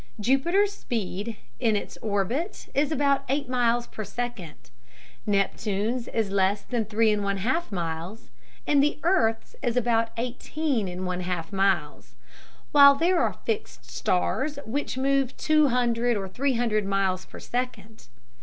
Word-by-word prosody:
Jupiter's 340 - +2
speed 220 - -4 0.2
in 220 -2 +2
his 205 - -4
orbit 225 - -2
is 290 +2 +1
about 280 -2 +2
eight 280 0 0
miles 240 -1 +1
per 215 - -7
second, 195 - -6 0.6
Neptune's 210 +3 0
is 220 -4 -1
less 200 +1 +1
than 235 -3 -2
three 220 +1 +2
and 210 -1 0
one 200 0 0
half 260 - -1
miles, 170 +3 -5 0.3
and 285 -1 +4
the 295 +1 +1
earth's 275 -11 +1
is 245 -2 -1
about 230 -1 +2
eighteen 250 0 -2
and 180 +1 -5
one 180 0 -2
half 175 0 -4
miles; 190 -6 0 0.6
while 280 -1 +8
there 340 +5 +2
are - - +1
"fixed 440 -1 -3
stars" 265 +11 0
which 265 +3 -3
move 270 -1 +1
two 305 -1 +4
hundred 240 -2 +1
or 195 -1 -4
three 265 +8 0
hundred 225 -3 +1
miles 195 -1 0
per - - -11
second. 225 - -5
230 Hz, 145 wpm, -26 LUFS, 195-270 Hz, 0.6 s, while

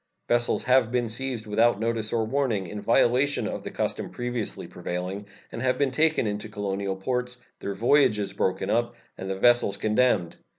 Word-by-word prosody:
Vessels 120 0 +1
have 125 -2 +3
been 120 -2 0
seized 120 -1 -3
without 110 +1 +2
notice 115 -1 -1
or 115 -1 +1
warning, 120 -5 0
in 105 +3 -6
violation 125 +6 +2
of - - -4
the - - -6
custom - - -3
previously 120 -3 -4
prevailing, 90 +3 -5 0.2
and - - -6
have 130 -1 +1
been 140 -2 +1
taken 155 0 +2
into 105 +1 -3
the 105 - -18
colonial 100 -2 -2
ports, 125 +5 -2 0.2
their 100 - -4
voyages 110 -3 +3
broken 95 0 -1
up, 120 +1 0 0.2
and 95 - -6
the 95 - -1
vessels 120 -2 +3
condemned. 110 -5 +1
115 Hz, 175 wpm, -26 LUFS, 100-125 Hz, 0.2 s, have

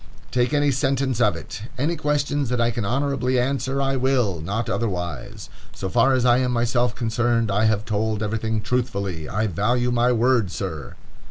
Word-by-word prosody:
Take 125 +1 +1
any 145 -1 +2
sentence 135 -2 0
of 105 - +3
it—"Any 130 +9 -4
questions 145 -3 0
that 125 -1 0
I 120 0 +2
can 115 -1 -3
honorably 130 +1 0
answer, 135 +1 -1
I 135 -1 +1
will; 125 - +1
not 100 +7 -2
otherwise. 90 - -3 0.3
So 95 - -4
far 125 +5 +3
as 125 -1 +1
I 120 0 +5
am 125 -1 0
myself 120 0 +1
concerned, 115 -2 0
I 105 +3 +2
have 110 -1 +1
told 110 0 -1
everything 110 +1 -1
truthfully. 100 -9 -2
I 105 +3 0
value 120 +6 0
my 120 +1 +3
word, 120 -3 +2
sir." 80 -9 -5
120 Hz, 170 wpm, -23 LUFS, 105-130 Hz, 0.3 s, I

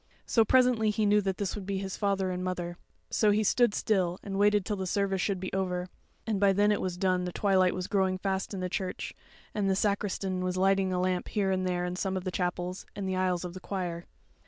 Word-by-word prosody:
So 225 - +4
presently 245 -2 +4
he 210 +1 +1
knew 210 0 +4
that 190 -1 -2
this 200 -2 -2
would 200 -3 -6
be 200 -1 -1
his 190 -1 -4
father 195 -2 0
and 180 0 -3
mother; 175 -1 -3 0.4
so 215 - +3
he 210 +1 +3
stood 235 +1 +3
still 185 -4 +1
and 195 -1 -3
waited 205 -1 +4
till 210 - -1
the 190 -1 -3
service 195 0 0
should 195 -2 0
be 185 0 -5
over; 180 -1 -1 0.4
and 215 -3 -1
by 200 -1 +4
then 205 +2 +3
it 210 - +1
was 180 -1 -3
done 185 -1 +1
the 180 - -3
twilight 185 -1 +2
was 185 -1 -3
growing 190 -1 +1
fast 190 0 -2
in 195 -3 -4
the 185 - -1
church, 185 0 -4 0.4
and 200 -2 0
the 190 - +3
sacristan 195 -2 -1
was 185 0 -1
lighting 195 0 +3
a 180 - 0
lamp 180 -1 0
here 200 -3 0
and 185 -1 0
there 180 -1 0
in 180 0 -3
some 190 0 -1
of 185 - -4
the 185 - -3
chapels, 180 0 -3
and 200 -2 -3
the 190 - -1
aisles 185 -1 0
of 175 - -6
the 185 - -7
choir. 175 -3 -4
190 Hz, 245 wpm, -29 LUFS, 185-200 Hz, 0.4 s, So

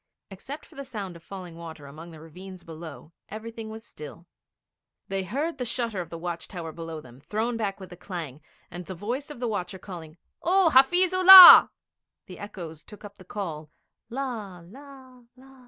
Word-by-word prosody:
Except 270 +10 -9
for - - -21
the 275 - -8
sound 205 -9 -8
of 170 - -14
falling 180 -2 -10
water 160 -3 -11
among 155 +5 -12
the 160 -2 -13
ravines 180 +3 -12
below, 160 -3 -11 0.2
everything 225 +1 -8
was 220 0 -10
still. 155 -2 -12 0.8
They 195 0 -2
heard 280 - -4
the - - -2
shutter 235 -5 -3
of 170 - -9
the 165 - -8
watch 170 0 -6
tower 170 -4 -8
below 165 -1 -8
them 125 -1 -17
thrown 220 - -3
back 205 -4 -4
with 190 -1 -11
a - - -10
clang, 165 -6 -8 0.3
and 175 0 -9
the 190 - -7
voice 245 - -5
of 295 - -10
the 245 - -3
watcher 190 -4 -4
calling: 175 -4 -11 0.2
'Oh, 365 -1 +2
Hafiz 350 +8 +4
Ullah!' 370 0 +11 0.6
The 185 - -12
echoes 170 -6 -9
took 210 0 -14
up 205 0 -13
the 185 - -15
call, 165 -6 -7 0.4
'La 225 -9 -6
la 260 +2 -15
la!' 265 +1 -19
195 Hz, 185 wpm, -25 LUFS, 165-250 Hz, 0.8 s, Ullah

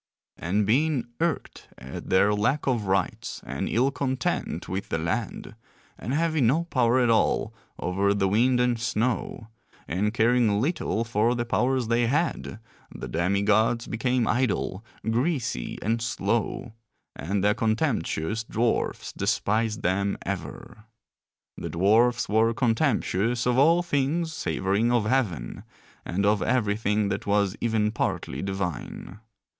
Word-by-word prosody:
And 100 +5 0
being 130 +3 +1
irked 165 -3 -2
at 65 +2 -8
their 100 +2 +4
lack 120 +8 0
of 120 -6 0
rights 95 -2 -1
and - - -3
ill 130 +4 +2
content 130 -2 -2
with 95 +2 -4
the - - 0
land, 95 +6 -3 0.4
and 110 - -6
having 155 -3 +2
no 155 +8 +2
power 130 -6 +2
at 120 -2 +3
all 110 - +1 0.2
over 100 +2 0
the 100 -1 +1
wind 120 +6 +3
and 125 -1 +1
snow, 115 -1 -2 0.4
and 100 +5 0
caring 115 -2 +3
little 120 - -1
for 115 +1 +1
the 120 0 -2
powers 125 +1 +1
they 120 +1 +2
had, 150 -5 -1 0.3
the 65 - -7
demi 90 +9 0
gods 110 +3 +2
became 120 +1 0
idle, 115 -5 0 0.2
greasy, 120 - -1
and 115 +2 0
slow; 115 +1 -2 0.4
and 95 +7 -2
the 105 +1 +4
contemptuous 110 - -1
dwarfs 115 +1 -1
despised 110 +1 0
them 100 +2 0
ever. 105 0 -6 0.7
The 85 - -5
dwarfs 110 +8 +3
were 110 +2 +2
contemptuous 115 -3 +1
of 125 +1 +2
all 165 +5 +5
things 160 +1 0
savouring 100 -3 0
of 120 -3 +2
heaven, 105 - -1 0.4
and 100 +3 -1
of 105 0 +3
everything 105 -3 +1
that - - -3
was 100 -1 +2
even 110 -2 +1
partly - - -2
divine. 95 0 -5
115 Hz, 135 wpm, -26 LUFS, 100-125 Hz, 0.7 s, all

